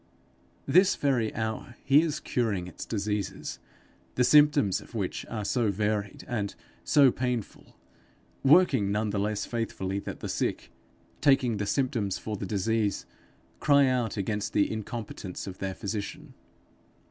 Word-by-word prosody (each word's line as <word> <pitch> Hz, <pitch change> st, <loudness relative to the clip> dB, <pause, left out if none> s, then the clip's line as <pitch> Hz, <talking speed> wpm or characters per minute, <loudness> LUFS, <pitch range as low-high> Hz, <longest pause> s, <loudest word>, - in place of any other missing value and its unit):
This 185 Hz, +3 st, +5 dB
very 125 Hz, -6 st, +1 dB
hour 110 Hz, +2 st, -4 dB
he 140 Hz, +3 st, +6 dB
is 155 Hz, -2 st, -1 dB
curing 105 Hz, -7 st, -1 dB
its 90 Hz, -, -8 dB
disease, 100 Hz, -3 st, -3 dB, 0.6 s
the 125 Hz, -, +3 dB
symptoms 145 Hz, -8 st, +5 dB
of -, -, -14 dB
which -, -, -3 dB
are 105 Hz, -3 st, -4 dB
so 115 Hz, 0 st, +1 dB
varied 105 Hz, 0 st, -2 dB
and 105 Hz, -4 st, -3 dB, 0.3 s
so 135 Hz, -, +5 dB
painful; 125 Hz, -4 st, -4 dB, 0.7 s
working 140 Hz, -, +5 dB
none 105 Hz, +1 st, 0 dB
the 100 Hz, -, -1 dB
less 105 Hz, +1 st, -1 dB
faithfully 100 Hz, -5 st, -3 dB
that -, -, -7 dB
the -, -, -5 dB
sick, -, -, -2 dB, 0.5 s
taking 130 Hz, -5 st, +3 dB
the 105 Hz, 0 st, -2 dB
symptoms 115 Hz, -7 st, 0 dB
for 110 Hz, -, -5 dB
the 100 Hz, -1 st, -5 dB
disease, 105 Hz, +1 st, 0 dB, 0.5 s
cry 140 Hz, -1 st, +5 dB
out 125 Hz, -4 st, 0 dB
against 105 Hz, +1 st, -2 dB
the 100 Hz, -, +2 dB
incompetence 110 Hz, -3 st, -6 dB
of 95 Hz, -1 st, -8 dB
their 95 Hz, -1 st, -3 dB
physician. 100 Hz, +1 st, -5 dB
110 Hz, 140 wpm, -28 LUFS, 100-125 Hz, 0.7 s, he